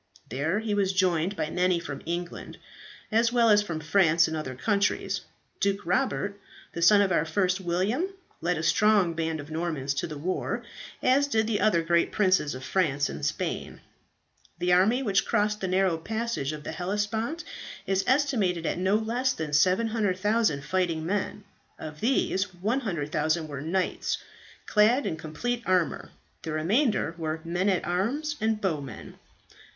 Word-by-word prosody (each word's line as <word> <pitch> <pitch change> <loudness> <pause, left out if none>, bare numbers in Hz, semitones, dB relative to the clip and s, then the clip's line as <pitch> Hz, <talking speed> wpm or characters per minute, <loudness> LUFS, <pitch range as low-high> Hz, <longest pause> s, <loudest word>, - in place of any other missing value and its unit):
There 145 - -1
he 220 -1 -2
was 195 -2 +1
joined 185 0 +1
by 155 -4 -2
many 180 0 +2
from 145 -5 -6
England, 175 +1 -5 0.5
as 230 +2 +3
well 235 -2 +4
as 205 0 +6
from 170 -6 -4
France 165 0 +3
and 160 - -3
other 130 -5 -4
countries. 200 - 0 0.4
Duke 200 -1 0
Robert, 200 +1 0 0.3
the 170 - -4
son 200 +4 +7
of 195 - 0
our 170 - +3
first 180 +3 0
William, 190 - 0 0.3
led 175 +1 0
a 160 - -3
strong 205 -1 +3
band 160 -1 -2
of 145 +2 -9
Normans 155 -4 -2
to 145 - -2
the 155 -2 -7
war, 180 +6 -2 0.4
as 275 +3 +4
did 220 -5 +1
the 220 -2 0
other 170 -6 +3
great 170 0 +2
princes 185 -9 +2
of 130 - -8
France 145 -2 +1
and - - -7
Spain. - - -3 0.8
"The 180 +1 +2
army 215 +9 +4
which 195 -4 +2
crossed 210 -1 0
the 190 - -1
narrow 185 -2 +2
passage 220 -6 -2
of 150 -1 -7
the - - -5
Hellespont 210 - -2 0.4
is 195 -1 +1
estimated 235 - +1
at - - -1
no 190 +2 +2
less 240 +4 0
than 155 -7 -5
700,000 205 -1 +2
fighting 175 -4 0
men. 205 +2 -2 0.3
Of 155 -1 -8
these 205 -5 +1
100,000 170 - -1
were 140 -2 -6
knights 180 +5 -1 0.5
clad 225 +6 +3
in - - -1
complete 230 +11 -3
armour, 185 -3 +1 0.3
the 160 - -4
remainder 195 - +1
were 160 0 -2
men 175 +4 0
at 185 -3 0
arms 255 - -1
and 220 -1 +1
bowmen. 150 - -4
185 Hz, 160 wpm, -27 LUFS, 165-215 Hz, 0.8 s, son